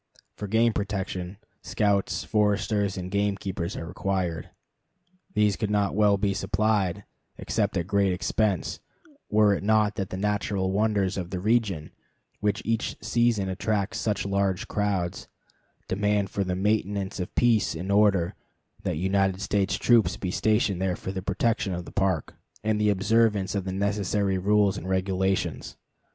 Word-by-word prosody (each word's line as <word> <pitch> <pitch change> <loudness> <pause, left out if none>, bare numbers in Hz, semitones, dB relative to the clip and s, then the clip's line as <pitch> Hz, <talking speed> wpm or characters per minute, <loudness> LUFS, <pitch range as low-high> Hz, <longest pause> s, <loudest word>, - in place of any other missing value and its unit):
For 105 - -5
game 115 +3 +3
protection 95 -2 -3 0.2
scouts, 100 -2 0
foresters, 105 -1 +1
and 90 0 -5
gamekeepers 100 -2 -2
are - - -5
required. 90 -2 -2 0.9
These 105 -2 +3
could 110 - -2
not 105 -1 +1
well 105 0 +4
be 100 0 0
supplied, 100 -2 0 0.3
except 105 -3 -1
at 85 - -1
great 100 0 +2
expense, 100 +2 -1 0.5
were 105 -1 +4
it - - -2
not 105 0 +3
that 95 -3 -2
the 95 - -5
natural 100 -1 -1
wonders 100 -2 +1
of 90 -2 -4
the 90 -1 -3
region, 100 -6 0 0.5
which 105 +1 0
each 115 0 -1
season 120 -5 +1
attracts 100 +2 -1
such 105 -3 -1
large 100 -1 0
crowds, 100 -4 -2 0.6
demand 100 0 0
for 100 - 0
the 90 -1 -2
maintenance 100 -1 -1
of 90 - -5
peace 115 -8 +3
and 90 +5 -4
order 100 -4 +3 0.5
that - - -2
United 95 +1 +1
States 95 0 0
troops 120 -3 +3
be 90 - -3
stationed 105 -3 +1
there 95 -2 0
for 95 - -6
the 95 -1 -4
protection 105 -1 0
of 85 0 -5
the - - -10
Park, 95 -6 0 0.3
and 110 0 +1
the 105 - +3
observance 105 -1 +2
of 100 -2 -2
the 95 - -3
necessary 100 0 0
rules 100 0 +2
and 95 - -7
regulations. 95 0 -1
100 Hz, 150 wpm, -26 LUFS, 95-105 Hz, 0.9 s, well